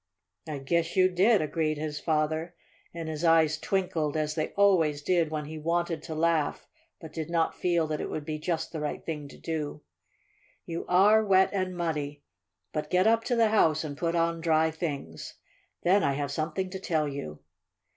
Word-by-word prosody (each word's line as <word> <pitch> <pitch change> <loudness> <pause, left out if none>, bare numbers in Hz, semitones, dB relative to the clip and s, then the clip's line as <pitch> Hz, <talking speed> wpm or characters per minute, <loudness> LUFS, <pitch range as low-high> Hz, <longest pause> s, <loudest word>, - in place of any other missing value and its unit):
"I 150 -2 -4
guess 165 +5 -1
you 185 -1 +5
did," 195 +1 +4
agreed 155 0 -1
his 150 -1 -4
father, 160 +2 -1 0.4
and 165 -1 -6
his 160 0 -4
eyes 160 -2 +4
twinkled 165 -6 -1
as 155 -1 -1
they 155 -1 -1
always 165 -8 +3
did 170 -2 +2
when 155 -1 -3
he 155 +1 -7
wanted 170 0 -1
to 160 - -6
laugh 165 -1 0 0.3
but 160 -2 -11
did 160 -1 -4
not 165 -1 +1
feel 170 -2 +1
that 155 -1 -3
it - - -4
would 150 - -4
be 155 0 -4
just 160 0 -2
the 160 - -4
right 150 0 -4
thing 150 -3 -4
to - - -13
do. 150 -2 -4 0.8
"You 170 0 -5
are 205 +5 +5
wet 190 -2 +4
and 185 -2 -2
muddy. 150 -4 -3 0.5
But 150 0 -3
get 180 +2 +3
up 225 +1 +4
to 245 - +1
the 230 -2 +4
house 160 -8 +3
and 145 -2 -5
put 170 +3 -1
on 165 0 +1
dry 160 -1 +3
things. 145 - -5 0.5
Then 195 +3 +4
I 140 - +2
have 140 0 -3
something 165 +5 -2
to 190 - -5
tell 160 -5 0
you." 105 - -6
160 Hz, 190 wpm, -28 LUFS, 150-175 Hz, 0.8 s, you